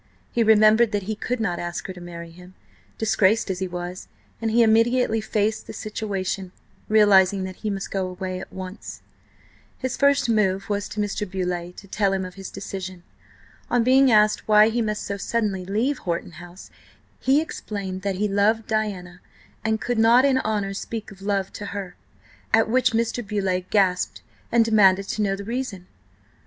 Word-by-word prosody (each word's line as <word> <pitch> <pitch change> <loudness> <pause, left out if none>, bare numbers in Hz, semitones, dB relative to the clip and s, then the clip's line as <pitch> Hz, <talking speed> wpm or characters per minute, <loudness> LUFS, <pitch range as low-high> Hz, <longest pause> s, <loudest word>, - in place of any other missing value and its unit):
He 235 - 0
remembered 220 +1 +5
that 205 -1 0
he 215 +3 -3
could 245 +3 -3
not 180 -6 -1
ask 175 0 -4
her 190 - -5
to 180 - -12
marry 170 -1 -9
him, 180 +2 -15 0.4
disgraced 215 -1 +2
as 180 - -4
he 190 - -2
was, 180 +1 -6 0.3
and 225 - 0
he 235 +2 +4
immediately 230 0 +3
faced 215 0 -1
the - - -7
situation, 195 -3 -4 0.4
realising 200 -3 +5
that 185 0 -6
he 215 - -3
must 195 -1 -4
go 190 -2 -1
away 185 0 -5
at - - -9
once. 190 +2 -8 0.7
His 260 -1 -3
first 280 -2 +3
move 195 -4 +1
was 205 0 -2
to 210 - -6
Mr. 205 -1 -2
Beauleigh, 180 -2 -3
to 200 - -13
tell 200 0 +1
him 190 -1 -1
of 185 - -8
his 195 0 -8
decision. 190 -2 -7 0.7
On 245 -1 +2
being 260 +2 +5
asked 215 -1 +3
why 215 0 +6
he 235 +1 0
must 210 -1 -2
so 200 - -4
suddenly 200 -3 -1
leave 230 +9 0
Horton 170 0 -3
House, 175 +1 -12 0.5
he 270 +3 +3
explained 200 -11 -5
that 195 -1 -2
he 210 +3 0
loved 210 +3 +2
Diana 195 -5 -3 0.4
and 220 0 0
could 240 +2 -1
not 235 +4 +6
in 265 -2 +3
honour 205 -4 -1
speak 220 +1 -6
of 195 0 -14
love 195 -1 -1
to 205 - -6
her. 185 -3 -6 0.6
At 225 - +3
which 250 +1 +2
Mr. 230 +1 0
Beauleigh 195 -3 -2
gasped 190 -3 +1 0.3
and 230 -1 +4
demanded 195 -3 +4
to 215 - -2
know 195 -2 +1
the 200 - -7
reason. 225 -5 -4
205 Hz, 180 wpm, -23 LUFS, 185-220 Hz, 0.7 s, why